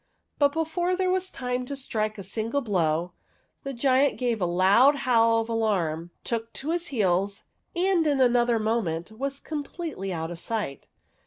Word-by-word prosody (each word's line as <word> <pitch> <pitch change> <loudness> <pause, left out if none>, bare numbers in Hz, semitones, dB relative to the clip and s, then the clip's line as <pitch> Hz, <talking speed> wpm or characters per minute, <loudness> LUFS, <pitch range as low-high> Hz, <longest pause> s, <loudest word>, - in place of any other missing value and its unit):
But 285 -1 +4
before 325 +4 0
there 370 0 +1
was 375 0 0
time 250 0 -3
to 280 - -4
strike 215 -5 -2
a 195 - -6
single 225 +8 -2
blow, 175 - 0 0.5
the 275 - -5
giant 265 +2 +2
gave 240 -4 -1
a 180 - +2
loud 195 +11 +5
howl 230 -4 +3
of 225 - -5
alarm, 185 -8 0
took 230 -1 -3
to 300 +4 -3
his 345 0 -1
heels, 200 - 0 0.3
and 350 -2 +2
in 285 -2 +2
another 240 -2 +4
moment 215 -6 -1
was 275 +5 -3
completely 300 - -5
out 165 -1 -3
of 170 - -7
sight. 210 -10 -3
235 Hz, 165 wpm, -26 LUFS, 195-280 Hz, 0.5 s, loud